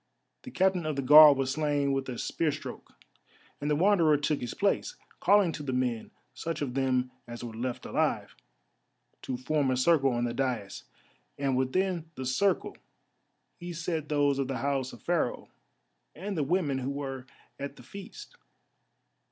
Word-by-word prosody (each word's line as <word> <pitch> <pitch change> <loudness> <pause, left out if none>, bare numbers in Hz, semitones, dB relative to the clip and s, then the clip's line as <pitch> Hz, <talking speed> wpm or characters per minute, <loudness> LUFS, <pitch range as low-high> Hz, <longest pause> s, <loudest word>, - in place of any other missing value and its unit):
The 255 - -9
Captain 185 -6 +1
of 155 - -1
the 140 - -2
Guard 150 +1 +9
was 135 -1 0
slain 145 -1 0
with 135 -1 -2
a 125 - -5
spear 160 +5 -1
stroke, - - -8 0.7
and 145 - -1
the 150 - +3
Wanderer 170 -3 +4
took 145 +1 -1
his 120 -1 -5
place, 205 - 0 0.2
calling 200 -4 +4
to 155 - -6
the 135 -3 -3
men, 125 -3 -1 0.2
such 160 +4 -4
of 130 -3 -4
them 130 -1 0 0.2
as 120 0 -8
were 120 -2 -6
left 120 +2 -4
alive, - - -1 0.9
to 130 - -4
form 140 +2 0
a 130 - +1
circle 135 0 +4
on 120 0 -1
the 120 -1 -1
daïs, 120 -7 -3 0.5
and 140 -2 0
within 165 +6 0
the 130 - -5
circle 190 +10 +1 0.8
he 175 0 -6
set 165 -2 -3
those 145 -2 +2
of 135 - 0
the 135 -1 -3
house 135 -2 -1
of - - -14
Pharaoh 170 -8 -1 0.7
and 195 +5 -5
the 155 - 0
women 145 -3 0
who 130 +1 -3
were 135 -2 -5 0.3
at 140 0 -5
the 125 - -14
feast. 200 - -11
140 Hz, 170 wpm, -29 LUFS, 130-165 Hz, 0.9 s, Guard